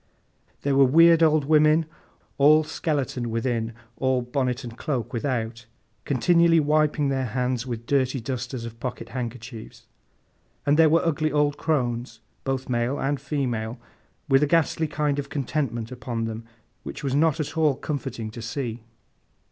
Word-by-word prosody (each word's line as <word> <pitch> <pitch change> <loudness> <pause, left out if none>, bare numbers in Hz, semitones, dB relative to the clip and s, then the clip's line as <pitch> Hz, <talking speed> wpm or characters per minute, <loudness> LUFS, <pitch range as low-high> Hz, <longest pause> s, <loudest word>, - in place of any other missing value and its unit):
There 140 -1 +1
were 140 - +6
weird 165 +5 +6
old 155 -3 +4
women, 155 +1 +4 0.5
all 155 +3 +6
skeleton 140 -6 -2
within, 115 -1 -2 0.2
all 130 -1 +1
bonnet 125 +1 -1
and 120 -2 -8
cloak 125 -4 -3
without, 115 -2 -3 0.4
continually 170 +4 +4
wiping 150 -1 +2
their 130 -4 -1
eyes 125 -1 -1
with 115 -2 -5
dirty 130 0 +1
dusters 125 0 -4
of 115 0 -9
pocket 125 0 -5
handkerchiefs; 120 -1 -7 0.8
and 145 0 +4
there 160 -1 +7
were 165 +2 +3
ugly 155 -1 +1
old 145 -1 +1
crones, 125 -6 -1 0.3
both 135 -1 -2
male 120 +2 0
and 140 0 -1
female, 125 -5 -2 0.5
with 135 0 +4
a 150 - +3
ghastly 165 0 +2
kind 150 -1 -1
of 140 0 -5
contentment 135 -5 -2
upon 120 -2 -4
them 115 0 -6 0.4
which - - -8
was 135 -2 -1
not 155 +2 +2
at 155 0 -3
all 155 -4 +3
comforting 130 -6 -4
to 115 - -8
see. 115 0 -4
135 Hz, 150 wpm, -25 LUFS, 120-150 Hz, 0.8 s, there